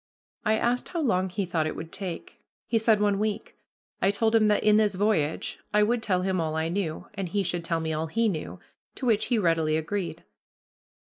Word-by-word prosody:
I 220 +1 +2
asked 245 +2 0
how 340 - -2
long 185 -7 +1
he 195 +2 -2
thought 165 -3 0
it - - -4
would 160 0 -7
take. 195 - -6 0.3
He 225 - +1
said 220 -1 +3
one 205 -1 +2
week. 215 0 -2 0.5
I 195 - +4
told 220 +2 +1
him 220 -1 +5
that 210 - +2
in 210 0 +5
this 210 -3 +2
voyage 185 -7 0 0.2
I 210 - +5
would 235 +2 +1
tell 185 -4 0
him 185 -2 0
all 160 -1 -2
I 160 +1 0
knew, 170 -3 -2
and 195 -3 -4
he 200 +3 0
should 175 -1 -2
tell 165 -1 -1
me 160 0 -2
all 155 +1 -2
he 230 +7 +1
knew, 165 -7 -4 0.4
to 265 - -5
which 220 -3 +2
he 245 - +1
readily 165 -5 +2
agreed. 175 +4 -3
195 Hz, 215 wpm, -27 LUFS, 165-215 Hz, 0.5 s, him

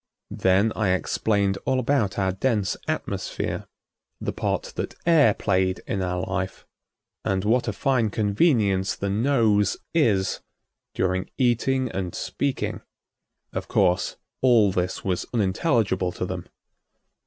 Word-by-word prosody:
Then 95 +4 +3
I 100 -4 +2
explained 100 +1 0
all 130 - +1
about 125 -6 +1
our 95 -2 +1
dense 105 0 0
atmosphere, - - -3 0.5
the - - -3
part - - -2
that - - -4
air 150 -10 +5
played 95 -1 0
in 95 - -2
our 90 0 -1
life, 95 0 -4 0.6
and 95 0 0
what 120 +3 +2
a - - +1
fine 120 0 +1
convenience 105 - +2
the 100 0 -2
nose 110 -3 +2 0.2
is 105 - +2 0.6
during 95 0 0
eating 130 +1 +2
and 95 -2 -4
speaking. 140 -2 -2 0.7
Of - - -4
course 90 0 +1 0.2
all 115 -6 +5
this 90 0 -2
was 90 -2 -1
unintelligible 100 - +1
to - - -3
them. - - -5
100 Hz, 125 wpm, -25 LUFS, 95-120 Hz, 0.7 s, air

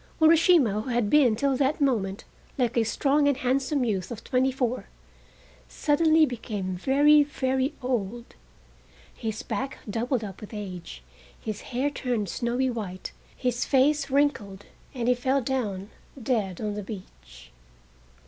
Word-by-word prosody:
Urashima, 320 - +5
who 240 - -7
had 240 -4 0
been 265 -7 +5
till 275 +4 +1
that 280 +3 +1
moment 215 -9 0 0.3
like 245 -3 0
a 235 - +3
strong 285 +6 +2
and 285 -3 +2
handsome 265 +1 0
youth 190 -5 -2
of 230 -2 -7
twenty 260 +1 +1
four, 255 -1 -2 0.8
suddenly 315 - +3
became 210 -7 -4
very, 290 +9 +5
very 265 -2 -1
old. 240 -2 -3 0.8
His 220 -2 -5
back 270 +1 -4
doubled 235 +3 -1
up 195 -3 -8
with 215 +1 -9
age, 180 - -7 0.4
his 215 -2 -5
hair 265 +4 -2
turned 240 -8 -2
snowy 245 +5 0
white, 195 -6 -6 0.3
his 250 -1 -1
face 280 +1 +2
wrinkled 260 -9 0 0.3
and 240 -2 -2
he 250 - +5
fell 260 +3 +1
down 220 -7 -3 0.3
dead 215 -7 -1
on 210 -1 -2
the 210 - -4
beach. 65 - -11
245 Hz, 140 wpm, -26 LUFS, 210-275 Hz, 0.8 s, Urashima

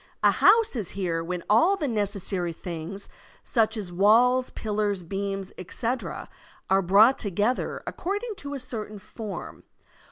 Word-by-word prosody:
A - - +7
house 440 -4 +4
is 210 -7 -2
here 170 -4 -2
when 175 0 -4
all 240 - +5
the 310 -7 -2
necessary 200 -6 -1
things, 170 +4 -6 0.4
^ch 225 -2 +1
as 195 -4 -5
Walls, 235 +7 +4
pillars, 205 -3 -2
beams, 195 +2 -4
etc., 230 +7 -4 0.4
are 195 0 +5
brought 205 +8 +5
together 210 +4 -1
according 410 +5 -3
to 285 0 -6
a - - -4
Certain 215 -4 -5
form. 210 0 -8
210 Hz, 135 wpm, -26 LUFS, 190-245 Hz, 0.4 s, A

